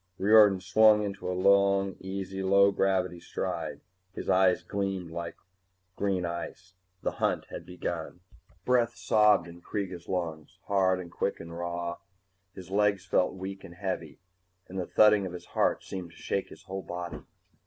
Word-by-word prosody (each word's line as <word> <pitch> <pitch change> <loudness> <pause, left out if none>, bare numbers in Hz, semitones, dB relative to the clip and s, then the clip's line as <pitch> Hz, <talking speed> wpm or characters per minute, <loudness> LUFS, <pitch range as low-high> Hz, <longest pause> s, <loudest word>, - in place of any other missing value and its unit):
Riordan 105 -2 +6
swung 105 +3 +5
into 100 -2 -4
a 90 - -2
long, 100 0 +3
easy 95 0 -5
low 100 +1 +5
gravity 95 -3 0
stride. - - -4 0.3
His - - -2
eyes 90 -1 +4
gleamed 95 -2 -3
like 85 0 -5 0.6
green 95 -3 0
ice. 85 +1 -6 0.3
The - - 0
hunt - - 0
was - - -5
begun! 90 -1 -5 0.4
Breath 120 -2 +2
sobbed 105 -7 +4
in 85 0 -12
Kreega's 90 -3 -5
lungs, 80 -4 -4
hard 95 -2 +2
and 85 -2 -8
quick 100 - -2
and 85 0 -8
raw. 85 0 -3 0.6
His 95 -1 -10
legs 100 -1 +2
felt 90 0 +1
weak 95 +1 -6
and 85 - -11
heavy, 90 -4 -4 0.5
and 95 +1 -5
the 90 - -3
thudding 105 -2 +5
of 90 - -8
his 90 - -8
heart - - +1
seemed 90 -3 -6
to - - -18
shake - - -2
his - - -13
whole 95 +1 -5
body. 85 -4 -6
95 Hz, 160 wpm, -29 LUFS, 85-100 Hz, 0.6 s, Riordan